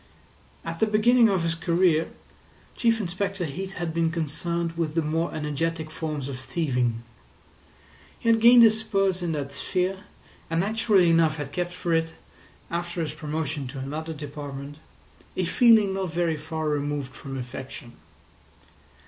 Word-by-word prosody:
At 165 0 -5
the 220 - +3
beginning 225 +2 +5
of 190 -4 +1
his 165 0 +1
career 165 -1 +2 0.7
Chief 230 -1 +2
Inspector 195 0 -2
Heat 190 +6 -5
had 170 -3 -3
been 165 0 +2
concerned 170 +1 -2
with 165 -2 -3
the 165 - +2
more 160 +3 -1
energetic 155 +1 -2
forms 155 -4 -4
of 135 -2 -6
thieving. 125 -6 -1 1.1
He - - -6
had 225 -1 +4
gained 240 +1 +9
his 220 -1 +5
spurs 195 -4 0
in 175 -2 -1
that 140 -2 -4
sphere, 185 +6 -2 0.4
and 165 0 0
naturally 210 -2 +3
enough 165 -2 +3
had 145 -2 -5
kept 175 +1 -2
for 180 -1 -2
it, 165 0 0 0.6
after 170 0 -2
his 155 -2 -3
promotion 155 -2 -3
to 135 +2 -8
another 150 +5 -4
department, 145 -1 -7 0.6
a 185 - +1
feeling 220 +1 +5
not 190 -3 -2
very 170 -1 0
far 160 +1 -4
removed 145 -2 -2
from 135 -1 -7
affection. 125 -1 -7
165 Hz, 150 wpm, -26 LUFS, 150-185 Hz, 1.1 s, gained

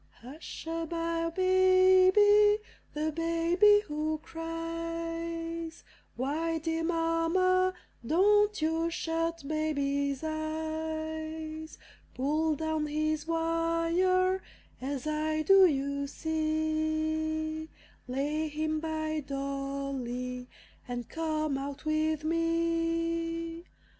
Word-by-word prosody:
Hush 285 +8 -9
a 330 0 -2
by, 330 0 -1
Baby! 375 +3 +5 0.4
the 310 +1 0
baby 335 +6 +4
who 305 +1 -2
cries. 330 0 -5 0.3
Why, 315 +6 -1
dear 325 +1 -2
Mamma, 345 +3 +2 0.3
don't 415 - +3
you 325 +1 +1
shut 330 -1 -2
baby's 280 -2 -1
eyes? 315 0 -4 0.4
Pull 305 +4 +1
down 315 0 -1
his 310 +1 -1
wire, 335 +3 +1 0.4
as 270 +1 -3
I 310 0 0
do, 385 +2 +7
you 280 -1 -1
see; 315 0 -1 0.4
Lay 295 +5 -1
him 310 +1 -1
by 315 -1 -2
Dolly, 275 -3 -4 0.4
and 245 -2 -4
come 310 -3 -1
out 280 +2 -6
with 310 0 0
me. 330 0 -1
320 Hz, 85 wpm, -30 LUFS, 310-330 Hz, 0.4 s, do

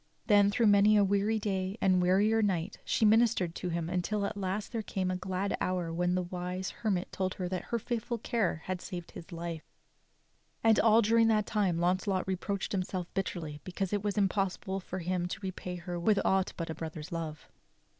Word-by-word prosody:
Then 205 -2 +5
through 225 +3 +2
many 205 +1 +6
a 205 - +5
weary 200 +3 +2
day 195 -1 -2
and 185 -1 +3
wearier 205 +5 +3
night 190 -2 -1
she 220 - +1
minis 225 +2 +5
tered 175 -3 -2
to 180 - -4
him 170 -1 -2
until 185 +4 -1
at - - -3
last 200 +1 -3
there 230 -2 -2
came 190 -3 -2
a - - -1
glad 185 +2 -2
hour 180 -3 -1
when 175 +1 +1
the 185 - 0
wise 180 +1 -4
her 220 - 0
mit 185 -2 -1
told 185 -1 -2
her 185 - -3
that 185 -1 -3
her 235 - -1
faithful 235 +1 -3
care 215 -8 -1
had 185 -1 -3
saved 175 -2 -7
his 170 - -10
life; 170 -1 -6 0.9
and 225 -1 +5
all 225 0 +5
during 225 +2 +4
that 215 -2 +3
time 195 -6 +1
Launcelot 185 +2 +1
reproached 190 +1 -2
himself 185 -2 -3
bitterly 160 -6 -3
because 190 +1 -3
it 205 -1 0
was 205 0 -1
im 200 -2 +4
possible 195 0 -2
for 185 0 -6
him 180 0 -1
to - - -5
repay 185 -1 -4
her 175 0 -5
with 205 +4 +3
aught 190 -1 +2
but 165 -1 -3
a - - -3
brother's 160 +1 -7
love. 160 -2 -5
190 Hz, 205 wpm, -31 LUFS, 180-205 Hz, 0.9 s, many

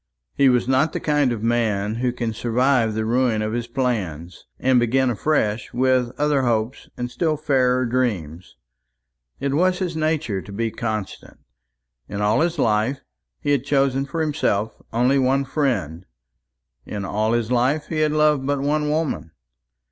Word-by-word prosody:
He 140 -1 +4
was 125 -1 +2
not 135 +5 +2
the - - -2
kind 145 -4 +1
of 115 -2 -4
man 110 -3 0
who 125 -1 +1
can 120 -2 -3
survive 120 0 +1
the 110 0 -1
ruin 115 -2 +1
of 110 0 -2
his 120 0 -2
plans, 95 - -3
and 130 -1 +3
begin 125 +2 +2
afresh 110 -3 0
with 130 -1 +2
other 150 -2 +2
hopes 120 0 -1
and 125 0 -4
still 155 0 0
fairer 130 -3 +2
dreams. 95 - -2 0.8
It 140 0 -1
was 180 +4 +2
his 180 -3 -3
nature 155 -11 -1
to 100 - -11
be 115 +3 -2
constant. 110 -4 -5 0.7
In 100 - -4
all 105 +5 +2
his 170 0 0
life 115 +2 +1 0.4
he 145 - 0
had 140 -4 +2
chosen 135 -1 +1
for 165 +4 -3
himself 115 -9 -1
only 125 +4 +2
one 135 +1 +2
friend 105 - -2 0.8
in 100 +5 -5
all 110 +3 0
his 120 0 -1
life 130 +5 +1
he 155 - -2
had 155 -1 +2
loved 150 -2 +3
but 145 0 0
one 150 +2 0
woman. 150 - -1
125 Hz, 165 wpm, -22 LUFS, 110-140 Hz, 0.8 s, He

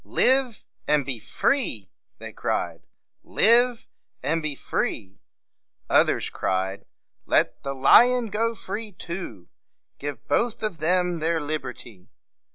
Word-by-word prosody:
"Live 260 -3 +2 0.2
and 150 -2 +2
be 130 -4 -3
free!" 110 - -1 0.3
they - - -9
cried. - - -3 0.3
"Live 240 +2 +3 0.4
and 160 +5 0
be 155 -2 -3
free!" 95 -7 -3 0.7
Others - - +3
cried, 95 +1 -2 0.4
"Let - - +1
the 140 0 -5
lion 240 - +5
go 230 +2 0
free 210 +1 -5
too! 170 - -7 0.5
Give 145 -1 -7
both 235 -2 0
of 205 -6 -3
them 180 +1 +1
their 165 +1 0
liberty!" 125 - -6
165 Hz, 115 wpm, -24 LUFS, -, 0.7 s, lion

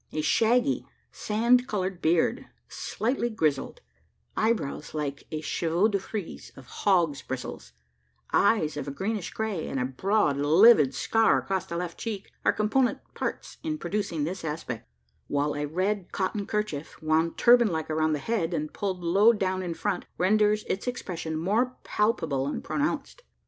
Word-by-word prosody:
A 155 - -1
shaggy 240 - +2 0.2
sand 235 +4 +2
coloured 190 -3 -2
beard, 160 +1 +2 0.2
slightly 240 +1 -2
grizzled; 160 - -1 0.5
eyebrows 170 -10 -1
like 140 -2 -4
a 155 -1 -3
chevaux 170 +6 +1
de 200 -2 0
frise 195 -1 -6
of 135 - -13
hogs' 170 -1 +1
bristles; 130 -1 -6 0.6
eyes 180 -8 +3
of 145 - -4
a - - -3
greenish 195 +5 -3
grey, 215 -7 -3
and 135 - -2
a 125 - 0
broad 150 +3 +1
livid 150 - +6
scar 225 0 +3
across 190 -2 -2
the 170 - -4
left 175 -1 -4
cheek 210 -4 -5
are - - +5
component 235 +4 +1 0.2
parts - - -4
in 310 -1 -2
producing 200 - -2
this 180 +5 -4
aspect; 155 - -5 0.4
while 145 +1 0
a 145 0 -2
red 185 +4 -1
cotton 195 +1 -2
kerchief, 210 -9 -3
wound 160 +1 +1
turban 240 -1 +6
like 160 -4 -2
around 155 0 +1
the - - +1
head, 175 0 -1
and 150 -1 -3
pulled 190 -3 -3
low 195 +7 +5
down 190 -4 -1
in 175 -2 -4
front, 200 -1 -2
renders 210 +3 +3
its 195 - -3
expression 170 -9 -3
more 220 +10 0
palpable 165 -11 0
and 145 - -3
pronounced. 305 +11 -2
185 Hz, 155 wpm, -27 LUFS, 155-215 Hz, 0.6 s, livid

